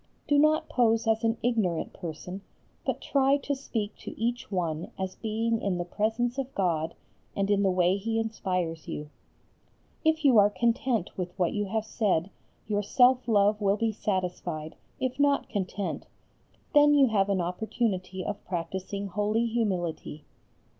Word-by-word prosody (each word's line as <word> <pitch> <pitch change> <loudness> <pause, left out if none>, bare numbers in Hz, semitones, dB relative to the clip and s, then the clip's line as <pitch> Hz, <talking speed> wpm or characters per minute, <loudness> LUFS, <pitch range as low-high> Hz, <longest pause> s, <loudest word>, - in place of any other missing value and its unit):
Do 290 0 +4
not 305 +1 +3
pose 225 -2 +2
as 225 0 +2
an 225 0 +1
ignorant 215 -9 0
person, 180 +2 -7 0.5
but - - -1
try 275 0 +3
to 285 0 -2
speak 225 -6 -3
to - - -9
each 235 0 -2
one 170 -4 -2
as 190 -1 -3
being 225 +1 -1
in 195 -3 0
the 175 - -2
presence 230 +7 -1
of 270 0 -4
God 165 -4 0 0.4
and 200 +1 0
in 200 -1 +3
the 195 - +3
way 180 +1 +3
He 225 +3 -2
inspires 185 -7 -2
you. 150 0 -6 0.9
If 315 -1 +2
you 250 -6 +7
are 205 0 +6
content 230 0 0
with 180 0 -4
what 180 -3 +1
you 205 -1 -1
have 220 +2 -2
said 200 -5 0 0.4
your 205 -1 +1
self 250 +5 +4
love 210 -1 +3
will 200 0 +2
be 225 +1 +1
satisfied, 180 -6 -3 0.2
if 260 +1 -2
not 285 0 +2
content, 195 -1 -3 0.7
then 295 -1 +6
you 280 -2 +7
have 200 -2 +2
an 195 -1 +1
opportunity 185 0 -2
of - - -4
practising 190 +3 -4
holy 210 +4 0
humility. 185 -9 -2
205 Hz, 160 wpm, -28 LUFS, 185-235 Hz, 0.9 s, you